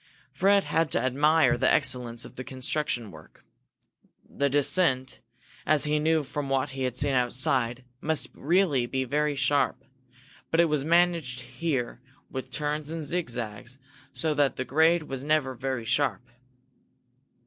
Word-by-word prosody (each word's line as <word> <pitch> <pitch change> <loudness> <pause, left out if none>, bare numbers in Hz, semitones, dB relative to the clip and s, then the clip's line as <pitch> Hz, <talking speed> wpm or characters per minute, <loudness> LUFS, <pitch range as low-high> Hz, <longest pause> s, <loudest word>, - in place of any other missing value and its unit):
Fred 195 +8 +3
had 165 -1 0
to - - +2
admire 150 +6 +3
the 130 +2 +3
excellence 125 -4 0
of - - -13
the 130 - -6
construction 130 -3 -2
work. 80 0 -16 0.8
The 140 0 -1
descent, 140 -2 +1 0.4
as 150 -2 +3
he 150 0 +1
knew 160 0 +2
from 140 0 -5
what 135 +1 0
he 135 0 -3
had 125 -1 -3
seen 140 0 +2
outside, 125 0 0 0.2
must 150 -5 0
really 155 -6 +1
be 130 +1 -1
very 150 +3 0
sharp. 140 +1 +1 0.6
But 165 - +1
it 170 - +6
was 150 -2 0
managed 165 -6 +2
here 125 -1 -3 0.3
with 130 -1 -5
turns 150 +2 -3
and 165 -1 -4
zigzags 120 - -4 0.3
so 160 -1 -1
that 145 -2 +1
the 130 - -3
grade 160 +4 +3
was 135 -3 -6
never 150 -3 +1
very 130 -2 -4
sharp. 125 -2 0
140 Hz, 150 wpm, -27 LUFS, 130-155 Hz, 0.8 s, it